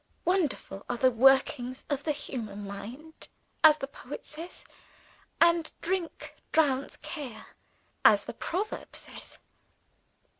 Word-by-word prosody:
Wonderful 320 - 0
are 245 - -1
the 255 +1 +4
workings 255 +1 +3
of 285 -1 -2
the 310 - +2
human 220 -8 -5
mind, 235 +11 -8 0.4
as 310 -1 +9
the 275 - -3
poet 275 -1 -9
says; 325 +4 -9 0.7
and 335 -1 +4
drink 360 -1 -3 0.2
drowns 280 -4 +2
care, 255 -9 -6 0.6
as - - +7
the - - -5
proverb 395 +6 -3
says. - - -8
280 Hz, 115 wpm, -29 LUFS, 245-320 Hz, 0.7 s, as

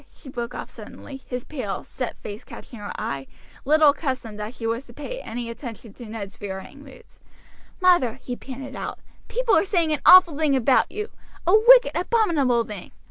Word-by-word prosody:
she 275 - -14
broke 240 -1 -5
off - - -5
suddenly, 270 -1 -11
his 250 -1 -4
pale, 245 -10 -5
set 250 -2 -5
face 210 +3 -7
catching 235 - -11
her 205 - -6
eye, 135 -1 -4 0.4
little 305 +1 +6
accustomed 260 -7 -4
as 215 +4 -6
she 225 - -5
was 230 +4 -2
to 240 - -14
pay - - -6
any 235 +1 -5
attention 230 -2 -8
to 240 0 -10
Ned's 215 -3 -7
varying 200 +8 -8
moods. 270 -2 -16 0.6
"Mother," 350 - +4
he 250 - -4
panted 270 +1 -8
out, - - -5 0.3
"people - - +1
are - - +4
saying 340 -6 +1
an 300 - -2
awful 360 -4 +8
thing 300 -2 +2
about 260 0 +3
you, 425 +2 -5 0.3
a 355 - +3
wicked, 485 +3 +7
abominable 330 - +2
thing. 210 -5 -8
260 Hz, 185 wpm, -24 LUFS, 230-320 Hz, 0.6 s, awful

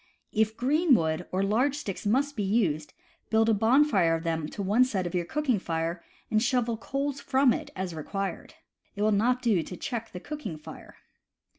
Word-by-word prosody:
If 220 0 +1
green 290 +3 +4
wood 160 -1 -1
or 185 +1 0
large 245 +8 +2
sticks 205 -8 -5
must 280 +6 +1
be 215 - -2
used, 190 -7 0 0.4
build 225 0 +3
a - - +5
bon 230 +8 +4
fire 180 - +2
of 165 - -4
them 160 -2 -1
to 200 - -5
one 210 +6 +4
side 205 -8 -1
of 175 - -4
your 175 -1 0
cooking 265 - 0
fire, 165 0 -3 0.3
and 215 - +3
shovel 240 -1 +1
coals 275 +4 -3
from 265 -1 +3
it 305 -2 -5
as 185 -2 -3
required. 195 +5 -5 0.4
It 205 - -1
will 215 - +3
not 245 +5 +2
do 215 -8 +3
to 180 +2 -8
check 230 -3 -4
the 180 - -7
cooking 220 - -6
fire. 150 - -12
215 Hz, 195 wpm, -28 LUFS, 180-255 Hz, 0.4 s, a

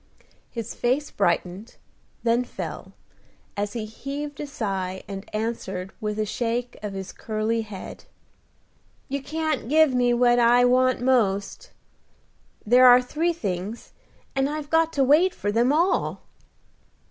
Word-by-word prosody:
His 230 -2 -6
face 265 +5 0
brightened, 185 +3 -1 0.5
then 235 +1 +2
fell, - - -7 0.6
as 205 0 -2
he 225 -2 -3
heaved 280 +6 -6
a 295 - -4
sigh, 190 -7 -3
and 195 0 -7
answered, 215 -4 -4
with 210 -1 -2
a 215 - 0
shake 240 +3 -2
of 210 -1 -5
his 190 -1 -6
curly 220 +1 -2
head, 210 -4 -9 1.0
"You 280 +1 -2
can't 310 -3 -2
give 310 -2 +5
me 245 -1 +3
what 240 0 +4
I 240 +1 +5
want 255 0 +3
most. 240 - +1 1.0
There 250 +4 +7
are 245 0 +9
three 310 +7 -1
things, 205 - -5 0.4
and 270 +1 +1
I've 295 -1 -5
got 325 0 +3
to 275 - +2
wait 320 +7 +4
for 205 - -2
them 235 +4 +3
all." 335 +6 +1
240 Hz, 135 wpm, -24 LUFS, 210-275 Hz, 1.0 s, are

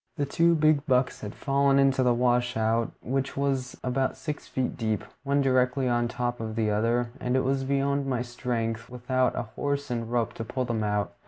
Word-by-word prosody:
The 145 - +1
two 170 +4 +3
big 155 -2 +3
bucks 130 0 +2
had 105 -1 -6
fallen 140 0 +2
into 135 -1 +4
the 125 -1 +4
washout, 120 -2 +1
which 135 +3 -2
was 135 -2 -1
about 130 +1 0
six 150 -2 -5
feet 130 -1 -2
deep, 110 -3 -1 0.2
one 140 0 +1
directly 130 0 +2
on 120 -1 +1
top 120 0 -2
of 110 -1 -4
the 110 -2 +1
other, 115 +3 +1
and 125 +1 -1
it 130 - +2
was 135 +1 0
beyond 140 +1 0
my 125 -2 0
strength, 115 -2 -3
without 125 +1 0
a - - -1
horse 140 -1 -2
and 115 -1 -3
rope, 120 -2 0
to 115 - -5
pull 130 +3 -2
them 115 -3 -1
out. 105 -1 -1
125 Hz, 195 wpm, -27 LUFS, 115-135 Hz, 0.2 s, into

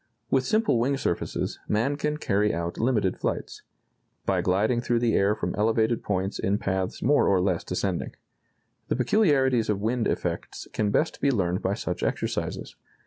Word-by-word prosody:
With 130 -1 +2
simple 215 - +2
wing 135 +4 +1
surfaces... 85 -10 -2
man 115 +7 +1
can 150 +1 -1
carry 105 -6 +1
out 85 +1 -3
limited 110 -6 +1
flights... - - -3 0.6
by - - +1
gliding 105 +6 +1
through 120 -1 +1
the 115 -1 +1
air 100 +2 +3
from - - -3
elevated 110 +2 +1
points 95 0 -2
in 100 +2 +1
paths 95 -2 -2
more 145 +4 +4
or 95 -2 +4
less 90 -2 0
descending. 90 -1 -2 0.7
The - - 0
peculiarities 130 - +3
of 105 -2 +1
wind 115 +3 0
effects - - -3
can 105 -1 0
best 155 +10 0
be 140 - +3
learned 95 -7 0
by 95 +2 0
such - - -4
exercises.... - - -2
110 Hz, 165 wpm, -26 LUFS, 95-130 Hz, 0.7 s, more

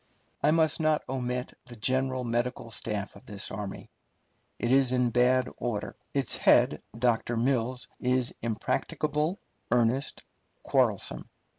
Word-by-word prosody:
I - - +4
must 160 0 +3
not 155 -1 +2
omit 125 -1 -3
the 120 - -10
general 130 +3 0
medical 120 0 -2
staff 105 -3 -4
of 100 - -15
this 100 -1 -6
army. 105 -2 -6 0.7
It 120 - -1
is 135 -1 +5
in 125 -1 +2
bad 125 +2 +3
order. 115 -4 -3 0.2
Its - - +2
head, - - +4 0.2
Dr. 120 -1 +1
Mills, 125 0 0
is 125 0 +1
impracticable, 150 - -1 0.3
earnest, 125 +3 +1 0.4
quarrelsome. - - 0
125 Hz, 125 wpm, -29 LUFS, 115-130 Hz, 0.7 s, is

